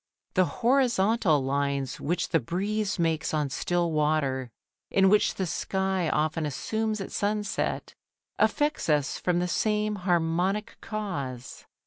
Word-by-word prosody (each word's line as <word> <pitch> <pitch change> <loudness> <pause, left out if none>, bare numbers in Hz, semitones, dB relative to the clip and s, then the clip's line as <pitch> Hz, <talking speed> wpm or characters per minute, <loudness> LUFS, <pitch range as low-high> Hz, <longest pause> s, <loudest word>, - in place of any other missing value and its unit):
The 185 -1 +4 0.2
horizontal 225 - +3
lines 140 -1 -1
which 175 +3 -1
the 165 - +3
breeze 200 - -2
makes 160 -2 0
on 150 -3 0
still 175 +3 0
water, 150 -4 0 0.4
and 190 0 +4
which 210 - +3
the 190 - -1
sky 190 0 -1
often 155 +2 0
assumes 215 +9 -2
at 195 - -6
sunset, 210 0 -1 0.5
affect 295 - +1
us 145 -2 +1
from 180 -1 +1
the 175 0 +1
same 210 +3 0
harmonic 180 +3 0
cause. 140 - -5
175 Hz, 125 wpm, -27 LUFS, 150-210 Hz, 0.5 s, The